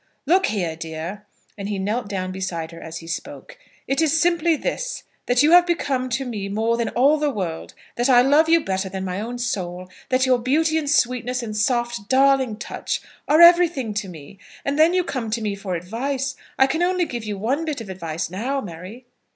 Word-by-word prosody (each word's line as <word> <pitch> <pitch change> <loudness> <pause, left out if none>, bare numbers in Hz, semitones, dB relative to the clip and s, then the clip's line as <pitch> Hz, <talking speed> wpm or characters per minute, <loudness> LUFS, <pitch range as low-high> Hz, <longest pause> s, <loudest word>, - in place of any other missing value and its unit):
"Look 360 +6 +3
here, 175 -6 -2
dear," 165 +6 -7 0.3
and 200 +1 -4
he 205 - -2
knelt 210 +4 -2
down 185 -2 -3
beside 180 -4 -4
her 165 - -11
as 160 0 -7
he 165 - -10
spoke, 170 - -7 0.3
"it 275 +4 +1
is 320 0 +2
simply 340 -1 +2
this, - - -3 0.2
that 245 +2 +3
you 305 - +4
have 350 0 +7
become 270 -7 -1
to 260 +2 -2
me 210 -5 -4
more 220 +3 0
than 235 -1 -1
all 280 +5 +3
the 300 -1 +1
world; 180 -10 -5 0.2
that 240 +3 +1
I 245 -1 +7
love 295 +4 +4
you 330 0 +5
better 190 0 -1
than 190 0 -5
my 185 +2 -3
own 240 +3 -5
soul; 185 -6 -4 0.2
that 255 0 +2
your 255 -1 +3
beauty 310 +6 +2
and 290 -2 -3
sweetness, 250 -2 +1
and 215 -2 -5
soft, 240 -1 -1
darling 265 -4 +3
touch, 215 - -4 0.3
are 310 +3 +5
everything 340 -9 +6
to 210 -1 -3
me. 165 +3 -12 0.3
And 280 +2 -1
then 330 +3 +5
you 365 - +3
come 255 -9 -4
to 225 +2 -1
me 210 -2 -2
for 195 -2 -4
advice! 260 +10 -3 0.2
I 265 - +6
can 315 +5 -1
only 360 0 +2
give 240 -7 -5
you 210 -2 -4
one 255 +10 -1
bit 305 -4 -3
of 225 - -8
advice 170 -3 -4
now, 250 +9 -2
Mary." 190 +5 -9
240 Hz, 210 wpm, -22 LUFS, 195-280 Hz, 0.3 s, have